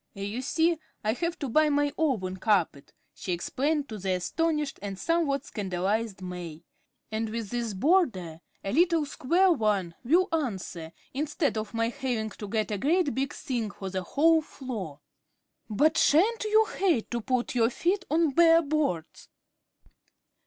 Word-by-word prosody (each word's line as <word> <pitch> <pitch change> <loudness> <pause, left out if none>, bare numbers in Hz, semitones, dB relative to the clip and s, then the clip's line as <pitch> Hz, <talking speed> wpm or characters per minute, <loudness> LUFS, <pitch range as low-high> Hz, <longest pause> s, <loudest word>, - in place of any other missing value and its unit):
"You 205 +5 -4
see 320 +4 +1 0.2
I 215 +1 +1
have 335 +6 -2
to 285 - -4
buy 305 +5 +3
my 290 0 +1
own 205 -12 0
carpet," 185 -9 0 0.2
she 180 - -4
explained 285 - -1
to 215 -2 -6
the 190 0 -1
astonished 300 - -1
and 200 -1 -5
somewhat 285 - 0
scandalized 195 +1 -2
May; 175 -3 -7 0.5
"and 220 0 -2
with 220 -2 -5
this 235 -4 -2
border 190 - +1 0.2
a 195 - -3
little 335 0 +3
square 340 +7 +2
one 210 - +1
will 345 +9 +3
answer, 190 - -3 0.2
instead 290 -1 -1
of 215 0 -4
my 230 0 +1
having 240 -5 -3
to 210 - -8
get 215 +1 -1
a 205 - -2
great 315 - +2
big 270 +1 -1
thing 235 -5 -3
for 195 -1 -7
the 190 0 -2
whole 320 - +3
floor." 215 - -7 0.7
"But 310 +10 +3
sha'n't 425 +9 +3
you 435 +1 +4
hate 345 - +1
to 240 -1 -1
put 250 +1 -1
your 230 -2 +3
feet 370 +9 0
on 320 0 +2
bare 330 +3 +6
boards?" 285 - -2
250 Hz, 155 wpm, -28 LUFS, 200-315 Hz, 0.7 s, bare